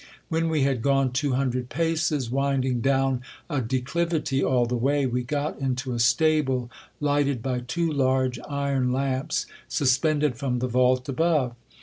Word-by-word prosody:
When 165 0 0
we 155 -3 +1
had 135 -4 +1
gone 135 -1 +2
two 135 +2 0
hundred 125 -1 -1
paces, 160 -6 0
winding 135 -2 0
down 135 -1 +1 0.3
a 145 -3 0
declivity 135 +4 -1
all 125 -2 +2
the 120 +1 -2
way, 140 +4 +1
we 125 0 0
got 145 +4 -3
into 130 -1 -2
a 120 - -3
stable 130 0 +2 0.3
lighted 145 -4 +1
by 125 -2 -1
two 165 +7 -2
large 130 -2 +1
iron 140 -3 0
lamps 135 +3 -1 0.2
suspended 145 0 +1
from 130 -2 -1
the 125 +1 -1
vault 125 +1 +2
above. 140 -3 +1
135 Hz, 150 wpm, -25 LUFS, 125-145 Hz, 0.3 s, gone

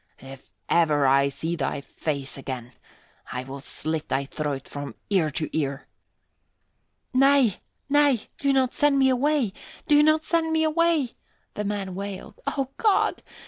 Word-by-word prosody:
If 135 0 -12 0.2
ever 150 -4 +3
I 140 +1 +4
see 160 +5 -3
thy 140 -4 -2
face 140 -1 -4
again, 130 -3 -6 0.6
I 125 - -3
will 135 +1 -8
slit 155 +3 -3
thy 140 +1 0
throat 145 -1 -4
from 145 0 -7 0.2
ear 180 -6 +3
to 155 +2 -2
ear." 140 -2 -2 1.3
"Nay, 270 -5 +4 0.3
nay, 285 -4 +4 0.2
do 280 - +2
not 260 -2 +2
send 290 -1 +3
me 265 -1 +4
away! 260 -4 +1 0.3
Do 295 -2 +6
not 310 +1 +4
send 330 -1 0
me 320 0 +2
away!" 315 -4 +2 0.4
the 210 - -3
man 200 -2 -3
wailed. 200 - -7
"O 270 -2 -1
God! 420 -3 +2
195 Hz, 145 wpm, -25 LUFS, -, 1.3 s, Do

